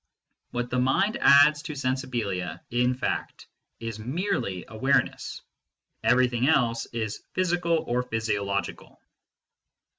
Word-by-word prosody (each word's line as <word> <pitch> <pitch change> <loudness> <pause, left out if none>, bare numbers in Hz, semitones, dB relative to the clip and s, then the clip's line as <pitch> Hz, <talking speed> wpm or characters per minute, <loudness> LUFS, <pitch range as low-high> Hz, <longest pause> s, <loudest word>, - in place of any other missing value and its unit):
What 120 0 -3
the 125 - +1
mind 135 +12 +2
adds 145 +1 +6
to 150 - -6
sensibilia, 120 - -2
in 125 +1 +2
fact, 130 - -3 0.3
is 115 -2 -5
merely 120 - -2
awareness: 130 +5 0 0.6
everything 125 0 +3
else 120 -7 +2
is 110 -3 -4
physical 175 -3 +1
or 125 +1 +1
physio 110 -4 -2
logical. 100 0 -4
125 Hz, 110 wpm, -26 LUFS, 110-140 Hz, 0.6 s, adds